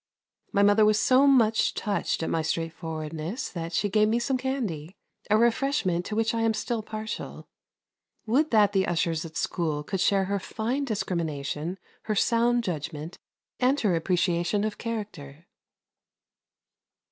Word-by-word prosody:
My 200 - +3
mother 205 +1 +5
was 215 0 +4
so 265 +4 +5
much 225 -5 +3
touched 200 -5 -1
at - - -2
my 165 - +1
straightforwardness 160 - -4
that 165 -1 -5
she 205 - +1
gave 215 +2 +3
me 225 +2 +2
some 260 +3 0
candy, 220 - -3 0.3
a 210 - +5
refreshment 235 - +1
to 210 - -4
which 225 +1 +1
I 230 - 0
am 225 -1 +2
still 235 0 -2
partial. 215 0 -6 0.8
Would 275 +8 +2
that 210 -3 +4
the 190 -1 +2
ushers 165 -1 0
at 160 -1 -8
school 155 -4 -1
could 190 +5 -3
share 195 0 +3
her 200 +1 -1
fine 235 +8 -2
discrimination, 170 - -3 0.3
her 215 - -1
sound 235 +3 +2
judgment, 160 -3 -5 0.4
and 260 +3 +3
her 205 -5 +2
appreciation 175 +3 +1
of 215 -1 -3
character. 180 -10 -6
205 Hz, 145 wpm, -27 LUFS, 165-225 Hz, 0.8 s, mother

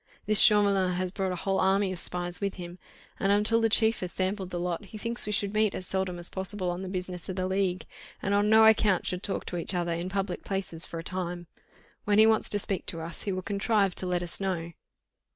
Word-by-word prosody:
This 215 0 +6
Chauvelin 200 -3 +5
has 180 0 -2
brought 190 -1 -2
a - - -2
whole 190 +2 -1
army 195 0 +2
of 185 - -2
spies 175 +1 0
with 200 -1 -2
him, 175 0 -9 0.4
and 195 - +1
until 215 +3 +2
the 225 - +3
chief 220 +1 +3
has 180 -1 -4
sampled 190 0 -2
the 175 - -4
lot, 175 +3 -3
he 215 - -10
thinks 230 +2 -4
we - - -1
should 205 -1 0
meet 215 -1 +1
as 185 - -4
seldom 190 -1 -2
as 175 0 -3
possible 190 -1 -3
on 175 +1 -5
the 190 - -5
business 180 -1 -4
of 185 - -3
the 185 -1 -2
league, 190 -1 -1 0.3
and 200 - -2
on 205 +1 +2
no 220 0 +7
account 215 -4 +4
should 180 0 -3
talk 195 - -3
to 175 - -4
each 175 +2 -1
other 175 -1 -1
in 170 +2 -3
public 195 -1 -3
places 190 -4 -4
for 170 - -7
a 165 - -5
time. 175 -1 -4 0.6
When 205 0 +2
he 220 - +8
wants 220 0 +3
to 205 - +4
speak 195 -2 -2
to 165 - -2
us, 165 0 -6
he 200 - -2
will 185 0 -3
contrive 200 -1 +1
to 185 - -4
let 180 -1 -1
us 175 +3 -5
know." 175 -3 -2
190 Hz, 245 wpm, -28 LUFS, 180-205 Hz, 0.6 s, he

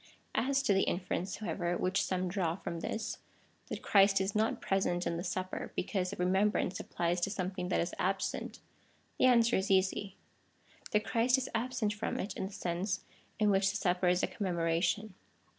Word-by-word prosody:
As 275 +2 +1
to 240 - +3
the 195 - +3
inference, 185 +1 -1
however, 175 -4 -2
which 185 +2 +1
some 185 -1 -1
draw 175 -3 0
from 170 -2 -5
this 220 +6 -3 0.2
— - - -36
that - - -6
Christ 195 -1 +5
is 190 +1 -1
not 215 +1 +1
present 180 -2 0
in 170 - 0
the 170 - -3
Supper, 185 0 -3
because 185 -1 -1
a - - -5
remeinhrance 190 +1 +1
applies 175 +1 -1
to 185 - +1
something 185 -2 -3
that - - +2
is 170 +1 -1
absent; 190 +1 -1 0.6
the - - +5
answer 235 -2 +5
is 190 +1 -1
easy 195 0 +1 0.4
— - - -19
that 210 0 +2
Christ 245 +3 +3
is 260 - -3
absent 235 -2 0
from 210 - -3
it 200 - -3
in 190 - -3
the - - -10
sense 190 +2 -2 0.4
in 210 -2 +3
which 195 0 +3
the 205 - -1
Supper 180 -2 +1
is 180 +1 +3
a - - +3
commemoration. 175 +2 0
190 Hz, 190 wpm, -32 LUFS, 180-210 Hz, 0.6 s, Christ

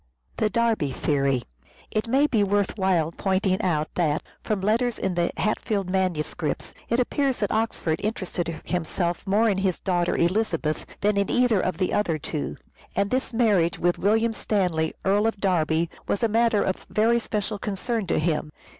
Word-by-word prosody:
The 215 - +2
Derby 145 - +1 0.5
It 215 +2 -1
may 270 +5 +4
be 225 -8 +2
worth 200 0 +1
while 185 -6 +1
pointing 190 +2 0
out 155 -6 0
that, 155 -3 0 0.2
from 215 -2 -1
letters 225 +4 +1
in 190 - -1
the 175 0 +1
Hatfield 205 -3 -1
Manuscripts, 175 -5 -1 0.2
it 235 - +2
appears 265 +1 +1
that 205 - -1
Oxford 215 -7 0
interested 185 -5 -2 0.2
himself 175 +1 -2
more 210 +4 +3
in 195 -3 +1
his 190 -2 0
daughter 175 -2 0
Elizabeth 170 -4 0
than 205 0 +2
in 200 - +1
either 245 -6 +3
of 185 - -1
the 185 0 0
other 180 -6 +1
two, 150 0 -4 0.4
and 200 0 +1
this 255 +1 0
marriage 210 -8 +2
with 175 0 +1
William 225 +3 +2
Stanley, 180 -8 0
Earl 205 +3 +3
of 225 -3 -2
Derby, 170 -4 +1 0.2
was 200 - -1
a - - +5
matter 225 -1 +3
of 190 - -3
very 230 +2 +3
special 210 -2 -3
concern 210 +1 -2
to - - +1
him. 155 -1 0
195 Hz, 165 wpm, -25 LUFS, 170-220 Hz, 0.5 s, a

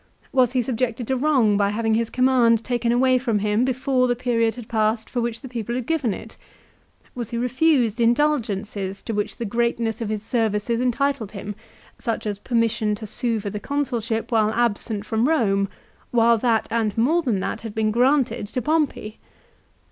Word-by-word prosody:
Was 255 -2 +3
he 255 -2 +2
subjected 245 0 -2
to 265 - +2
wrong 255 -7 +3
by 200 -1 +2
having 220 +1 0
his 230 0 +1
command 245 -3 +3
taken 240 -1 0
away 255 +1 +3
from 235 -4 0
him 210 +3 +1
before 260 0 +1
the 245 - +1
period 230 -2 0
had 240 -3 -9
passed 220 0 0
for 245 - -2
which 235 -1 -3
the 265 - -8
people 235 -1 -4
had 250 -2 -3
given 305 -7 0
it? 220 +3 -8 0.8
Was 240 -3 -5
he 235 - -3
refused 250 -2 +2
indulgences 215 -7 0
to 225 - -4
which 205 -1 -2
the 235 - -4
greatness 235 0 -1
of 220 - -2
his 215 -1 -3
services 225 0 0
entitled 255 -3 0
him, 205 0 -6 0.5
such 230 -2 -3
as 205 -2 -3
permission 225 -2 0
to 215 - -8
sue 230 +2 -1
for 200 -1 -5
the 210 - -4
Consulship 240 -4 -2
while 220 -2 +3
absent 220 -2 -1
from 225 +3 +1
Eome, 200 -11 +2 0.4
while 235 -1 +4
that 230 -1 +1
and 225 -3 0
more 300 +10 +3
than 240 - 0
that 220 - -3
had 225 -2 -7
been 215 -1 +1
granted 245 -2 +2
to 230 - -3
Pompey 290 -7 -1
230 Hz, 185 wpm, -23 LUFS, 215-250 Hz, 0.8 s, while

